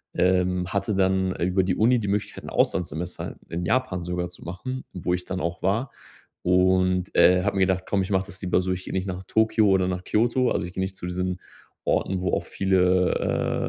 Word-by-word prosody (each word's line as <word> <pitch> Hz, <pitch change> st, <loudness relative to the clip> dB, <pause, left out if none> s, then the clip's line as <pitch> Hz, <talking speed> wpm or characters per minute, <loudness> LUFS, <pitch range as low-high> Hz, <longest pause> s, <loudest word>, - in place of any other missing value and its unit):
Ähm, 90 Hz, 0 st, +2 dB
hatte 100 Hz, +1 st, -1 dB
dann 95 Hz, -1 st, +1 dB
über 90 Hz, +2 st, +1 dB
die 90 Hz, -1 st, 0 dB
Uni 120 Hz, +4 st, +3 dB
die 100 Hz, -, -3 dB
Möglichkeit, 100 Hz, +1 st, -2 dB
'n -, -, -7 dB
Auslandssemester 90 Hz, -1 st, -1 dB
in 85 Hz, +1 st, -3 dB
Japan 95 Hz, -5 st, 0 dB
sogar 90 Hz, 0 st, -2 dB
zu 90 Hz, -, -13 dB
machen, 130 Hz, +10 st, -5 dB
wo 90 Hz, -1 st, -2 dB
ich 90 Hz, -, -2 dB
dann 90 Hz, 0 st, -3 dB
auch 85 Hz, 0 st, -3 dB
war. 110 Hz, +8 st, 0 dB, 0.5 s
Und, 90 Hz, 0 st, +2 dB
äh, 90 Hz, 0 st, +5 dB
habe 100 Hz, -1 st, 0 dB
mir -, -, +2 dB
gedacht: 95 Hz, -1 st, 0 dB
„Komm, 100 Hz, -, +1 dB
ich 95 Hz, -, -3 dB
mache 95 Hz, -1 st, +1 dB
das 95 Hz, -1 st, -12 dB
lieber 90 Hz, -1 st, +1 dB
so, 95 Hz, 0 st, -2 dB
ich 90 Hz, 0 st, -3 dB
gehe -, -, -6 dB
nicht 95 Hz, 0 st, -1 dB
nach 95 Hz, 0 st, -4 dB
Tokio 110 Hz, -1 st, +3 dB
oder 95 Hz, -1 st, +3 dB
nach 90 Hz, 0 st, -3 dB
Kyoto, 120 Hz, +5 st, +2 dB
also -, -, 0 dB
ich 90 Hz, -, -9 dB
gehe 95 Hz, -, -3 dB
nicht 95 Hz, 0 st, -3 dB
zu 90 Hz, -, -7 dB
diesen 90 Hz, 0 st, -2 dB, 0.5 s
Orten, 95 Hz, -1 st, 0 dB
wo 95 Hz, -, 0 dB
auch -, -, 0 dB
viele, 90 Hz, -1 st, +1 dB
95 Hz, 215 wpm, -25 LUFS, 90-95 Hz, 0.5 s, äh